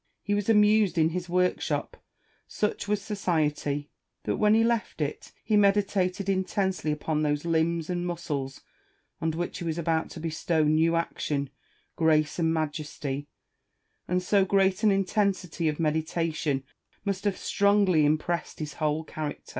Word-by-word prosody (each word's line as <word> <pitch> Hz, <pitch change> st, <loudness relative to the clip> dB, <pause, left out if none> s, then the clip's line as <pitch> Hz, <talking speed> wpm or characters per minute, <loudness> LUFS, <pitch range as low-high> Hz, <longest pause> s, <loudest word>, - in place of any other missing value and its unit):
He 205 Hz, -, -1 dB
was 205 Hz, +1 st, 0 dB
amused 210 Hz, -4 st, +4 dB
in 160 Hz, 0 st, +4 dB
his 180 Hz, +1 st, -4 dB
woi'kshop: 180 Hz, +1 st, 0 dB, 0.5 s
such 210 Hz, -1 st, -2 dB
was 210 Hz, 0 st, +1 dB
society. 150 Hz, -7 st, -1 dB, 0.3 s
But -, -, -1 dB
when 210 Hz, 0 st, +4 dB
he 225 Hz, -, +4 dB
left 230 Hz, -5 st, 0 dB
it, 150 Hz, -1 st, -3 dB
he 215 Hz, -, +1 dB
meditated 200 Hz, -2 st, +2 dB
intensely 190 Hz, -3 st, 0 dB
upon 150 Hz, +1 st, -1 dB
those 150 Hz, 0 st, 0 dB
limbs 165 Hz, 0 st, +1 dB
and 175 Hz, -1 st, -2 dB
muscles 145 Hz, -6 st, -4 dB, 0.6 s
on 160 Hz, -, +1 dB
which 170 Hz, +2 st, -3 dB
he -, -, -5 dB
was 165 Hz, -1 st, -2 dB
about 165 Hz, -1 st, 0 dB
to -, -, -9 dB
bestow 160 Hz, 0 st, 0 dB
new 160 Hz, +2 st, +3 dB
action, 145 Hz, -4 st, -2 dB, 0.4 s
grace, 155 Hz, 0 st, +2 dB
and 160 Hz, -1 st, +2 dB
majesty; 150 Hz, -3 st, -3 dB, 0.8 s
and 180 Hz, +1 st, 0 dB
so 195 Hz, +1 st, +3 dB
great 195 Hz, 0 st, +2 dB
an 215 Hz, -, +5 dB
intensity 195 Hz, -4 st, 0 dB
of 150 Hz, -, -4 dB
meditation 155 Hz, -2 st, -1 dB, 0.4 s
must 195 Hz, -1 st, -2 dB
have 200 Hz, -2 st, +1 dB
strongly 200 Hz, -5 st, +3 dB
impressed 155 Hz, +3 st, 0 dB
his 150 Hz, -2 st, -5 dB
whole 155 Hz, +1 st, +1 dB
character. 155 Hz, -1 st, -6 dB
170 Hz, 145 wpm, -27 LUFS, 155-195 Hz, 0.8 s, an